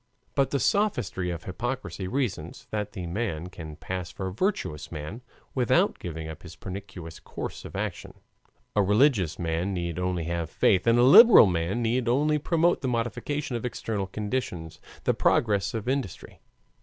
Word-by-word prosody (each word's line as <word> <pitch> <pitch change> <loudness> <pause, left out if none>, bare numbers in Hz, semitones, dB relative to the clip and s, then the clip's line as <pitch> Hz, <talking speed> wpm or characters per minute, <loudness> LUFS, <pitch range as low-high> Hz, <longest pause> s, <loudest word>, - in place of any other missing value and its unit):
But 135 -1 +2
the 140 - 0
sophistry 125 - 0
of 85 -1 -4
hypocrisy 95 -3 -4
reasons 100 - -3
that 105 -1 -3
the 90 - -5
merchant 90 -2 -3
can 80 -4 -8
pass 90 +2 -5
for 95 - -6
a - - -8
virtuous 185 - -2
man 80 +9 -6 0.3
without 125 -4 +2
giving 80 -2 -6
up 80 +1 -8
his 90 -2 -11
pernicious 90 -3 -8
course - - -7
of - - -9
action; - - -4 0.6
a 105 - +4
religious 105 - +3
man 85 +3 -1
need 85 -1 -3
only 90 -2 -1
have 85 -1 -2
faith 95 +5 +2
and 115 +1 +5
a 120 - +5
liberal 220 - +10
man 90 +5 0
need 120 +2 0
only 150 +5 +2
promote 170 +3 +2
the 135 - -2
modification 125 +3 -2
of 115 - -3
external 110 -4 -3
conditions 100 -6 -4 0.2
the - - +2
progress 100 -2 +2
of 110 0 -4
industry. 130 -7 -3
100 Hz, 165 wpm, -27 LUFS, 85-125 Hz, 0.6 s, liberal